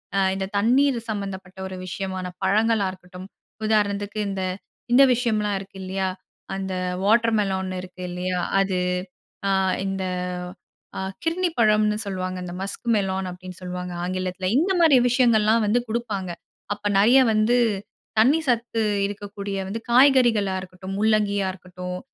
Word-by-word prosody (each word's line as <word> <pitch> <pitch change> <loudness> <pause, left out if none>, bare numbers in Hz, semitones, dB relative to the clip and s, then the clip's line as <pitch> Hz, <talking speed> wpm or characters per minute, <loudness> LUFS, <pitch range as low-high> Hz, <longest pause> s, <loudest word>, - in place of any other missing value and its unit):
அ 195 - +3 0.2
இந்த 195 - -2
தண்ணீர் 255 +5 +3
சம்மந்தப்பட்ட 195 -3 -5
ஒரு 190 - -7
விஷயமான 185 0 -4 0.2
பழங்களா 210 +1 +2
இருக்கட்டும். 185 0 -11 0.4
உதாரணத்துக்கு 205 -1 0
இந்த, 195 -1 -3 0.5
இந்த 275 +3 +8
விஷயம்லாம் 215 -4 0
இருக்கு 195 0 -11
இல்லையா, 190 0 -1 0.5
அந்த 190 -1 -3 0.3
வாட்டர்மெலன் 210 -4 +2
இருக்கு 185 0 -10
இல்லையா, 180 0 -2 0.2
அது 190 -2 0 0.7
அ - - +2 0.3
இந்த, 195 -1 -2 0.9
அ - - -2 0.3
கிர்ணிப்பழம்னு 225 -12 +2
சொல்வாங்க. 185 -2 -3
இந்த 175 - -6
மஸ்க் 200 +5 -5
மெலான் 190 -1 -1
அப்படின்னு 180 0 -10
சொல்லுவாங்க 180 0 -5
ஆங்கிலத்தில. 185 0 -2
இந்த 360 +5 +1
மாரி 310 -6 +7
விஷயங்கள்லாம் 230 -3 +4
வந்து 230 +4 +3
குடுப்பாங்க. 215 -5 -2 0.4
அப்போ 205 0 -4
நிறைய 240 +6 +6
வந்து, 215 +3 +3 0.6
தண்ணீ 270 +9 +5
சத்து 230 -1 0 0.2
இருக்கக்கூடிய 200 0 -6
வந்து, 220 +4 -4
காய்கறிகளா 240 -6 +5
இருக்கட்டும். 185 +1 -8
முள்ளங்கியா 205 -2 +2
இருக்கட்டும், 180 0 -7
200 Hz, 125 wpm, -24 LUFS, 190-225 Hz, 0.9 s, இந்த